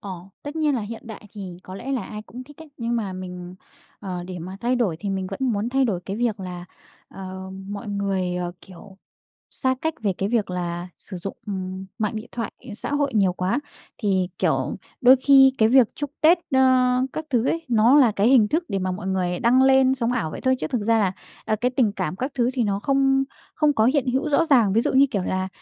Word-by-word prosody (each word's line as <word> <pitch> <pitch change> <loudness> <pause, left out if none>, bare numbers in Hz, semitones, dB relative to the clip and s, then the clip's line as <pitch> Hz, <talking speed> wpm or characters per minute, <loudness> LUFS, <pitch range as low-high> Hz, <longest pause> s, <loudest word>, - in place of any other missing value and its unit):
Ờ. 200 - -7 0.3
Tất 290 +2 -7
nhiên 305 -3 +2
là 245 - -1
hiện 220 +3 -7
đại 220 -1 -9
thì 190 -4 -8
có 185 - -9
lẽ 270 +7 -5
là 255 -5 -1
ai 210 +2 -7
cũng 250 +4 -10
thích 295 +2 -16
ấy, 320 -1 -12
nhưng 235 0 -1
mà 205 -5 -2
mình, 180 -1 -7 0.5
ờ, 185 -3 -5
để 180 -1 -7
mà 185 +3 -7
thay 245 +2 +1
đổi 210 -10 0
thì 200 - -3
mình 190 -1 -2
vẫn 195 - -5
muốn 210 +2 -1
thay 265 +2 +2
đổi 200 -8 -1
cái 195 - -3
việc 225 -3 -1
là, 180 -1 -6 0.4
ờ, 190 0 -8 0.2
mọi 205 +2 -6
người, 195 -3 -1
ờ, 175 -1 -3
kiểu, 190 +1 -14 0.6
xa 260 0 +1
cách 320 0 0
về 200 -3 +1
cái 195 - 0
việc 215 -4 0
là 175 0 -3
sử 190 - -8
dụng, 185 +3 -6
ừm, 190 -1 -5
mạng 215 0 -1
điện 215 - -6
thoại, 230 -3 -4 0.2
ờ, 210 - -6
xã 235 - -5
hội 285 -2 0
nhiều 195 -4 +3
quá. 185 +9 -1 0.4
Thì, 190 -3 +1
kiểu, - - 0 0.2
đôi 255 0 +7
khi 270 0 +6
cái 220 - +5
việc 250 -2 +5
chúc 290 -1 -4
Tết, 325 +3 +6 0.2
ơ, - - +5 0.5
các 310 - -4
thứ 245 -2 +2
ấy, 330 +2 -1
nó 235 +4 +5
là 240 -6 +5
cái 205 +2 +2
hình 240 -5 +5
thức 330 +3 0
để 195 - -1
mà 185 0 -2
mọi 190 +2 -6
người 180 -2 -1
đăng 250 +3 +4
lên 265 0 +5
sống 245 -2 -1
ảo 225 -11 -1
vậy - - -7
thôi, 260 0 +2
chứ - - -1
thực 245 -4 -2
ra 225 +1 +3
là, 190 -3 +1 0.3
à, 215 - 0
cái 245 +4 0
tình 245 -5 +1
cảm 185 -4 -3
các 260 +7 -3
thứ 245 -1 +1
thì 250 -3 0
nó 200 -1 -1
không 270 0 +2 0.3
không 300 -2 +3
có 220 -6 +2
hiện 265 +2 +2
hữu 270 +4 0
rõ 300 +3 +3
ràng. 240 -10 +4
Ví 220 - +3
dụ - - 0
như, 270 +1 +6
kiểu 200 - -1
là, 185 +1 -2
215 Hz, 245 wpm, -23 LUFS, 190-260 Hz, 0.6 s, đôi